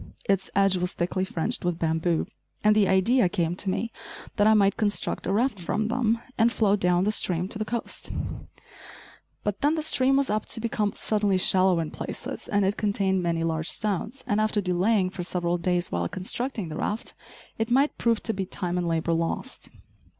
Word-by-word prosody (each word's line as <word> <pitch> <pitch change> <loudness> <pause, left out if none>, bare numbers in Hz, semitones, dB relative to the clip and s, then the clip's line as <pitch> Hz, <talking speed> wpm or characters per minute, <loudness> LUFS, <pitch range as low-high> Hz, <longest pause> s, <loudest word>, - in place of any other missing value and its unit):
Its 195 -1 +1
edge 195 -1 +4
was 180 0 -1
thickly 180 +2 -1
fringed 170 -4 -1
with 175 -2 0
bamboo, 165 0 0 0.4
and 210 0 +5
the 210 -2 +4
idea 190 +3 +3
came 170 -1 -1
to 195 +1 -3
me 225 +5 -2 0.4
that 205 -1 +3
I 220 - +6
might 200 -1 +4
construct 210 -2 -1
a - - 0
raft 220 +1 +1
from 210 +5 -1
them, 230 -2 +1 0.2
and 230 +1 +5
float 205 -3 +2
down 180 0 +2
stream 180 -4 0
to 210 - -5
the 215 - -1
coast; 235 +1 -3 1.3
but 205 -1 -2
then, 295 +3 +3
the 315 - -1
stream 270 -2 +3
was 275 -4 +1
apt 215 0 -2
to - - +2
become 215 -2 -1
suddenly 205 -3 +1
shallow 185 -1 +4
in 160 -2 -3
places, - - -5
and 200 -1 +1
it 195 +2 0
contained 195 -2 +1
many 170 -1 0
large 160 -1 -1
stones, 215 +5 -1
and 215 -3 +1
after 215 -1 +1
delaying 185 +1 +1
for 185 - -5
several 175 0 -1
days 175 0 0
while 85 0 -1
constructing 210 +1 -3
the 155 - -5
raft, 215 +2 -3 0.5
it 225 +1 0
might 275 +4 +3
prove 230 -2 +1
to 225 - 0
be 190 -2 -3
time 180 -2 -2
and 175 - -1
labor 165 0 0
lost. 165 0 -3
195 Hz, 195 wpm, -26 LUFS, 175-220 Hz, 1.3 s, I